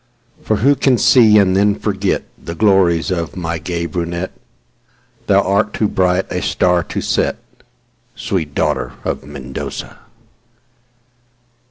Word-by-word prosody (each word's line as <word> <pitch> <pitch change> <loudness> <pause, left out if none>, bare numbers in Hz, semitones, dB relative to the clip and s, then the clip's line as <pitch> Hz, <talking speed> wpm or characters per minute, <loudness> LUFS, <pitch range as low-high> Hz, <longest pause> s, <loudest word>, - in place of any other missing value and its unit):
For 110 - 0
who 135 +7 +3
can 135 -2 +2
see 110 -5 +5
and 95 -2 +3
then 100 +1 +2
forgetThe 95 -4 -3
glories 95 -5 +3
of 85 -3 -3
my 85 -2 -3
gay 85 +1 -3
brunette—Thou 85 +3 -5
art 100 +2 +1
too 110 - +1
bright 95 -1 +1
a - - -2
star 90 -1 +1
to - - -4
set, - - 0 0.8
Sweet 80 -6 -3
daughter 75 -4 -1
of - - -3
Mendoza! 70 -2 -7
95 Hz, 120 wpm, -17 LUFS, 85-100 Hz, 0.8 s, see